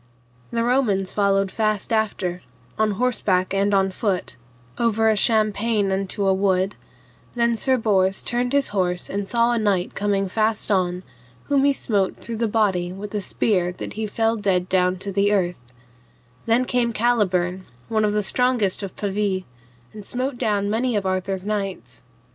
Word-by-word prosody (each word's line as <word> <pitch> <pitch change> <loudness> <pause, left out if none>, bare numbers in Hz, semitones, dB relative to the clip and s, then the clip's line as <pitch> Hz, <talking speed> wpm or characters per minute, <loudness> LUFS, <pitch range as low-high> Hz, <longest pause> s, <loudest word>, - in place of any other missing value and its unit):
The 230 0 -1
Romans 230 -7 +1
followed 195 -1 +1
fast 215 -1 -1
after, 195 -5 -1 0.3
on 215 -1 +1
horseback 195 -5 +1
and 200 +1 +2
on 195 -1 +2
foot, 190 -2 -2 0.4
over 225 -1 +2
a 220 - +3
champaign 215 -1 +2
unto 195 +1 -1
a 190 - +4
wood; 190 0 +1 0.6
then 235 -1 +2
Sir 260 +4 +2
Bors 195 -4 +1
turned 245 +1 -1
his 280 0 +2
horse 180 -3 -1
and 200 0 -2
saw 235 +1 +2
a 235 - +1
knight 195 -4 0
come 200 -1 0
fast 215 +2 0
on, 180 -2 +1 0.4
whom 280 -1 +2
he 285 - +5
smote 205 -8 0
through 230 -1 -6
the 230 0 0
body 195 -5 +1
with 200 +2 -8
a 210 - -1
spear 185 -3 0
that - - -7
he 220 0 -3
fell 225 +2 +1
dead 190 -4 0
down 180 0 +2
to 200 +2 -5
the 200 +1 +2
earth; 180 -5 0 0.9
then 235 +3 +3
came 245 -2 +1
Caliburn 190 -6 +1 0.2
one 220 -1 +1
of 210 -1 +1
the 210 0 +1
strongest 240 -2 +1
of 195 -2 -6
Pavie, 200 -2 -1 0.5
and 210 - -9
smote 255 +5 -3
down 205 -4 0
many 230 +3 0
of 200 -2 -1
Arthur's 185 0 -2
knights. 195 - -4
205 Hz, 165 wpm, -22 LUFS, 190-225 Hz, 0.9 s, he